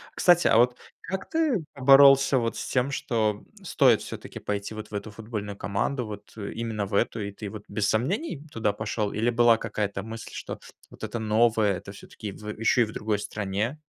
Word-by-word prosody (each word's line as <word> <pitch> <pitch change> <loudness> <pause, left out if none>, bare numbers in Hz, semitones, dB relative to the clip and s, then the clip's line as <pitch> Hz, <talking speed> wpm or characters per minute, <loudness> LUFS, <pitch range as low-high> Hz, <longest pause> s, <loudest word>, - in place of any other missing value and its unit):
Кстати, 175 -1 +5
а - - +4
вот 125 +1 +4 0.2
как 190 0 -5
ты 290 - +1
боролся 135 0 +7
вот 115 -1 -1
с - - -5
тем, 130 +2 0
что 110 -5 -1 0.2
стоит 130 - +4
все-таки - - -8
пойти 100 +1 -3
вот 110 0 -8
в - - -14
эту 105 +1 -5
футбольную 105 -2 -6
команду, 115 +5 -1
вот, 105 -1 -9
э, 100 - -5
именно 110 -3 -3
в 100 - -10
эту, 110 +3 +1
и 100 0 -4
ты 100 -1 -7
вот 105 0 -9
без 105 -2 -1
сомнений 150 - -1
туда 110 -2 0
пошел, 105 0 -2
или 115 +3 0
была 120 -1 +5
какая-то 105 -3 -3
мысль, 115 +1 -8
что - - -6 0.3
вот - - -14
это 115 - -3
новое- 110 -1 +3
это 100 - -10
все-таки 100 +1 -9
в, 105 +2 -11
э, 105 - -4
еще 115 +2 +3
и - - 0
в 105 - -9
другой 105 -1 -1
стране? 105 +6 -3
110 Hz, 205 wpm, -26 LUFS, 105-125 Hz, 0.3 s, боролся